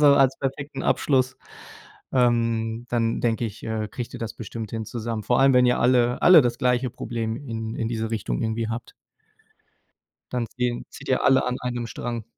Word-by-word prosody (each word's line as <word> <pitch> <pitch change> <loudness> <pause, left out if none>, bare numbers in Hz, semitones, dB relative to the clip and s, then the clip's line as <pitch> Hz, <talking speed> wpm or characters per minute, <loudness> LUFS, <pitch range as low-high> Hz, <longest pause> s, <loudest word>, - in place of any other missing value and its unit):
so 150 - +6
als 135 -1 +4
perfekten 135 0 -4
Abschluss. 130 -2 +1 0.8
Ähm, 115 -2 +1
dann 115 -1 0
denke 115 0 0
ich, 110 -1 -6
äh, 110 -1 -2
kriegt 120 +2 -6
ihr - - -5
das 115 -1 -4
bestimmt 110 -1 -7
hin 115 -1 -4
zusammen. 115 0 -4
Vor 120 - +2
allem 135 0 +6
wenn 125 0 +6
ihr 125 - +3
alle 125 0 +3
alle 180 -3 +9
das 120 -1 -1
gleiche 125 0 +1
Problem 115 -1 -4
in 115 -4 -5
in 115 - -2
diese 115 -1 -2
Richtung 95 - -2
irgendwie 110 0 -1
habt 115 +1 -5 1.4
dann 125 -2 -1
ziehen 125 -1 -1
zieht - - -11
ihr 130 - +2
alle 130 -1 +4
an 125 0 -1
einem 120 -1 -3
Strang. 115 0 -5
120 Hz, 185 wpm, -24 LUFS, 115-125 Hz, 1.4 s, alle